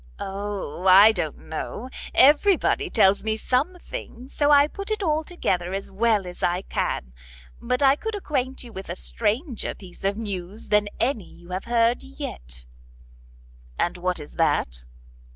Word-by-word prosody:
"O, 195 -3 -4
I 195 +4 +9
don't 175 -8 -2
know; 205 +9 -6 0.3
everybody 365 +7 +4
tells 200 - +4
me 220 0 0
something, 260 -1 -3
so 290 0 +1
I 290 0 +7
put 395 +6 -6
it 430 -1 -1
all 310 -2 +1
together 185 - -2
as 195 - -5
well 210 0 +2
as 180 0 -9
I 180 +2 +1
can. 60 - -2 0.5
But 250 +3 0
I 270 0 +6
could 445 +7 -4
acquaint 265 -9 -2
you 235 -2 -11
with 190 -1 -8
a 175 - -3
stranger 230 - -2
piece 185 -2 -14
of 200 +1 0
news 200 -2 -6
than 210 0 +3
any 235 -6 -1
you 175 +1 -16
have 185 +1 -4
heard 235 0 +2
yet." 65 - -7 1.1
"And 175 - 0
what 180 0 -1
is 150 - -11
that?" - - +1
220 Hz, 155 wpm, -24 LUFS, 185-275 Hz, 1.1 s, I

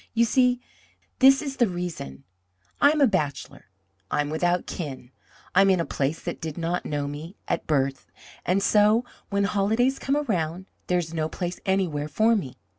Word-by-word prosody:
You 235 +1 +4
see, 250 +1 +3 0.6
this 270 +2 +6
is 275 -2 -5
the 240 - +4
reason: 175 - -5 0.6
I 285 - +7
am 300 0 +1
a - - +8
bachelor; 150 - -2 0.4
I - - +1
am 145 0 -3
without 175 +3 +1
kin; 135 -6 -6 0.4
I 185 - +6
am 195 - +5
in 185 -2 +3
a 170 - 0
place 145 +3 -2
that - - -5
did 160 -2 -5
not 170 +1 -2
know 145 -1 -2
me 155 +6 -7
at - - -2
birth. 135 -3 0 0.4
And 195 +2 +1
so, 215 +4 +4 0.2
when 200 0 +1
holidays 220 +7 +1
come 275 +2 0
around, 185 - -2 0.2
there 180 - +2
is 165 -2 -3
no 160 -1 -1
place 175 +1 -4
anywhere 175 -6 0
for 220 +10 +3
me. 140 - -4
180 Hz, 185 wpm, -25 LUFS, 155-220 Hz, 0.6 s, a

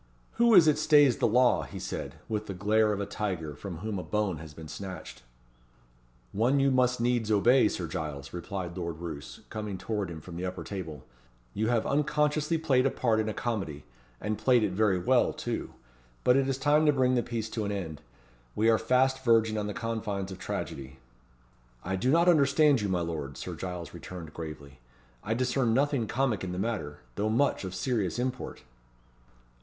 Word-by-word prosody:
"Who 235 -1 +5
is 170 -4 +8
it 150 -1 +4
stays 145 -5 +5
the - - +2
law?" 125 +2 +4
he - - -8
said, - - -5
with 105 -1 -3
the 95 - -5
glare 105 +3 +2
of 100 - -2
a 100 - -1
tiger 95 -7 -3
from 85 +5 -7
whom 105 -3 -2
a - - -5
bone 105 -5 -1
has 80 -1 -9
been 80 +1 -10
snatched. 90 -3 -8 1.1
"One 120 +7 +2
you 135 0 +3
must 125 -1 +2
needs 120 -2 +1
obey, 115 +4 +5
Sir 90 - -3
Giles," 75 -3 -5
replied 90 0 -5
Lord 85 -3 -4
Roos, 80 -4 -7
coming 105 -3 -4
towards 95 -1 -3
him 80 - -7
from 85 +1 -9
the 90 - -4
upper 90 -2 -4
table. 80 -8 -6 0.5
"You 110 +1 0
have 120 -1 +1
unconsciously 150 +2 +1
played 135 -5 +3
a - - +2
part 115 -4 +1
in 110 0 0
a - - -2
comedy 95 -12 -3 0.4
and 105 0 -3
played 125 -3 +4
it 105 - +1
very 100 0 +2
well, 120 +7 +2
too - - -4 0.5
but 125 - +5
it 135 0 +2
is 135 - 0
time 150 +3 +3
to - - +7
bring 130 -2 +2
the 125 - +3
piece 115 -2 -3
to 110 - -2
an 100 - -2
end. 85 -7 -5 0.5
We 110 +1 +4
are 110 - +3
fast 130 +1 +2
verging 115 -2 +4
on 105 -1 -2
the - - -3
confines 105 -4 -3
of 95 - -8
tragedy." 65 -7 -5 0.9
"I 95 +2 -2
do 105 +7 0
not 170 +4 +4
understand 145 -4 +5
you, 100 - -1
my 90 -2 +1
lord," 75 -5 -4
Sir - - -5
Giles 90 -3 -6
returned, 85 -1 -9
gravely. 70 -4 -8 0.4
"I 110 - -1
discern 125 -1 +1
nothing 140 -4 +1
comic 120 -4 0
in 90 -1 -3
the - - -4
matter; 95 - -3
though 105 - -1
much 120 +3 +1
of 95 -1 -5
serious 100 -1 -1
import." 125 - -4
110 Hz, 195 wpm, -29 LUFS, 90-130 Hz, 1.1 s, is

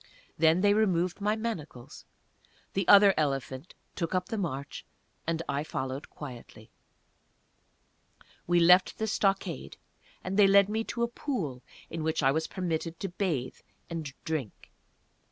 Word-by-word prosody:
Then 165 +2 +4
they 205 0 +5
removed 185 -3 +1
my 210 +1 +1
manacles; 165 - -6 0.7
the 195 -2 -1
other 200 -1 +8
elephant 135 0 -2 0.2
took 170 +1 -2
up 180 +1 -1
the 225 - -2
march, 140 -6 -4 0.4
and 165 0 -1
I 140 +1 -1
followed 135 -2 -5
quietly. 120 -6 -11 1.8
We 175 0 +4
left 180 +2 +5
the 220 - -1
stockade, 195 -7 -1 0.5
and 190 +2 -3
they 200 - +8
led 200 0 +6
me 220 +1 -1
to 235 - -2
a - - +2
pool 195 - -4 0.3
in 165 - -4
which 155 -1 -1
I 135 - +5
was 160 +3 -1
permitted 165 -3 -3
to 195 - -3
bathe 170 -9 -2 0.3
and 160 -4 -4
drink. 155 -9 -4
170 Hz, 140 wpm, -29 LUFS, 145-195 Hz, 1.8 s, other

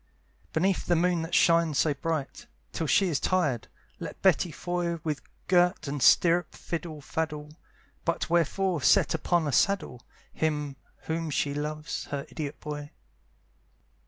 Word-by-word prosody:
Beneath 185 +4 +1
the 175 - +3
moon 175 0 +2
that 165 +1 -2
shines 165 -3 +4
so 150 0 +3
bright, 155 -1 -4 0.3
Till 165 - -2
she 190 +5 +3
is 150 - 0
tired, 150 - 0 0.3
let - - -7
Betty 185 -2 +4
Foy 175 +1 -2
With 150 -3 -2 0.2
girt 180 -3 +3
and 140 0 -3
stirrup 175 +5 +4
fiddle 165 -3 -5
faddle; 150 0 -3 0.5
But 170 - -1
wherefore 175 +1 +1
set - - +4
upon 175 -3 +1
a - - 0
saddle 175 - +1 0.3
Him 150 -3 -1 0.3
whom 165 0 -3
she 145 0 0
loves, 150 +1 -4
her 140 -1 -4
idiot 150 -2 -5
boy? 150 -1 -6
160 Hz, 140 wpm, -28 LUFS, 150-175 Hz, 0.5 s, shines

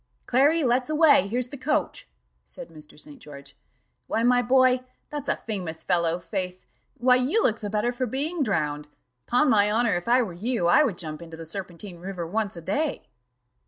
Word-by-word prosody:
"Clary, 290 +6 +3
let's 250 +2 +1
away, 305 - +5
here's 245 +4 -1
the 280 - -8
coach," 275 +4 -2 0.4
said 265 -2 -11
Mr. 150 -2 -14
St. 150 -1 -9
George. 140 -1 -12 0.5
"Why, 225 - 0
my 245 +1 +4
boy 255 +1 +4 0.3
that's 295 -2 -5
a - - +2
famous 180 -7 -6
fellow, 170 -1 +1
faith! 185 0 -5 0.3
why, 250 +1 +4
you 285 - +1
look 220 -1 +1
the 205 - -5
better 210 +3 0
for 250 +1 -3
being 295 +8 -3
drowned. 150 - -1 0.4
'Pon 250 +1 +3
honour, 210 +1 +3
if 175 +3 -4
I 245 +1 +4
were 190 -6 -6
you, 215 +2 -2
I 175 - +5
would 220 -11 -1
jump 155 -2 -7
into 165 -1 -10
the 165 - -8
Serpentine 175 +1 -7
river 180 -1 -5
once 205 +1 -2
a - - -7
day." 285 - -2
215 Hz, 185 wpm, -25 LUFS, 175-255 Hz, 0.5 s, away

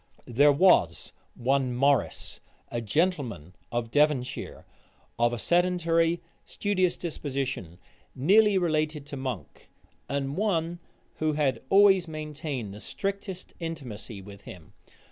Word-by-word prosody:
There 140 +5 +5
was 180 +6 +3 0.2
one 130 0 +1
Morrice, 140 +1 +1 0.3
a 120 - -2
gentleman 120 - -1 0.2
of 120 -1 -2
Devonshire, 145 -3 0 0.5
of 120 0 +3
a 120 - -3
sedentary, 170 +1 +2 0.2
studious 185 -3 0
disposition, 135 - -4 0.4
nearly 200 +8 +5
related 155 -4 0
to 145 - -7
Monk, 125 - -6 0.4
and 140 0 -2
one 175 -4 0 0.4
who 155 -1 +1
had 140 -5 0
always 195 -3 +6
maintained 150 -8 -5
the 105 - -9
strictest 195 - -5
intimacy 125 - -6
with 100 0 -12
him. 90 +1 -12
145 Hz, 110 wpm, -27 LUFS, 120-170 Hz, 0.5 s, always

